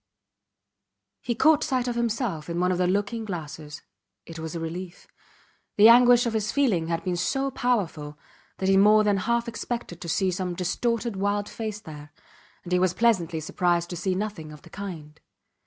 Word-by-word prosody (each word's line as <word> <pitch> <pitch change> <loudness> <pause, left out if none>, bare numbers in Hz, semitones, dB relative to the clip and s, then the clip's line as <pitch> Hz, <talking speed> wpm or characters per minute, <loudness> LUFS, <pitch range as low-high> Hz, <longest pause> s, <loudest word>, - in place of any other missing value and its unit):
He 240 - -2
caught 315 +2 +4
sight 255 -4 -1
of 245 - -1
himself 230 - -2
in 170 +1 -2
one 180 +1 +2
of 180 - -1
the 180 - +2
looking 205 +4 -1
glasses. 155 -6 -7 0.4
It 165 0 -9
was 160 +1 -6
a - - -3
relief. 175 +2 -7 0.7
The 215 +2 +8
anguish 245 0 +7
of 235 - -1
his 215 -1 -1
feeling 215 - +1
had 165 0 -2
been 180 -1 -1
so 270 +10 -1
powerful 165 - -2 0.4
that 190 - -2
he 195 0 +4
more 210 +2 +6
than 205 -1 +2
half 235 +4 0
expected 235 -6 -5
to 170 - -6
see 190 +2 +1
some 180 -1 -3
distorted 230 +4 -1
wild 205 +1 -1
face 215 -2 -5
there, 150 -5 -11 0.5
and 180 - -9
he 180 - +3
was 185 -1 +1
pleasantly 180 -8 +1
surprised 175 +2 0
to - - -4
see 185 +2 -1
nothing 190 -6 -4
of 150 -1 -13
the - - -16
kind. 160 -7 -8
190 Hz, 185 wpm, -25 LUFS, 170-230 Hz, 0.7 s, The